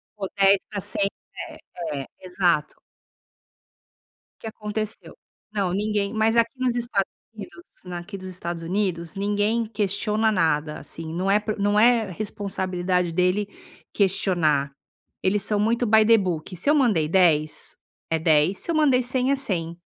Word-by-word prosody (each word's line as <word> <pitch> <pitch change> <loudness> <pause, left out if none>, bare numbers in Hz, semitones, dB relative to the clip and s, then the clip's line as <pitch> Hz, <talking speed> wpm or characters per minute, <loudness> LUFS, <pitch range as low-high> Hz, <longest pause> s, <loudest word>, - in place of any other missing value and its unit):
for 195 -2 -4
10 195 0 +6
pra 205 -2 -4
100 200 +1 0 0.4
né, - - -11 0.4
é, - - -9
exato. 180 -4 0 1.6
O - - -34
que 225 - -6
aconteceu? 215 0 -5 0.4
Não, 190 -4 0
ninguém 205 +1 -1
mas 225 +1 +2
aqui 230 0 +3
nos 255 -2 +1
Estados 235 -5 -1 0.2
Unidos 345 - -10 0.2
na 180 -1 -6
aqui 195 +3 -8
dos 185 0 -9
Estados 170 -2 -5
Unidos, 180 -1 -2
ninguém 205 +3 0
questiona 215 +1 0
nada, 160 -4 0
assim, 160 0 -8
não 185 +3 -1
é 205 +1 +4
por 215 -1 -4
não 205 +1 +2
é 230 -3 +4
responsabilidade 185 -3 -2
dele 180 +4 +1 0.5
questionar. 175 -8 +2 0.5
Eles 200 +1 +1
são 210 -1 +1
muito 230 +3 +1
by 220 0 +5
the 225 0 +6
book. 180 -2 -3
Se 230 - -1
eu 305 - +5
mandei 210 - +3
10, 160 -5 +2 0.3
é 165 - +1
10. 160 +3 +3
Se 340 - -2
eu - - -1
mandei 275 -5 +4
100 255 +2 0
é - - +3
100. 170 -10 -3
200 Hz, 155 wpm, -24 LUFS, 175-220 Hz, 1.6 s, 10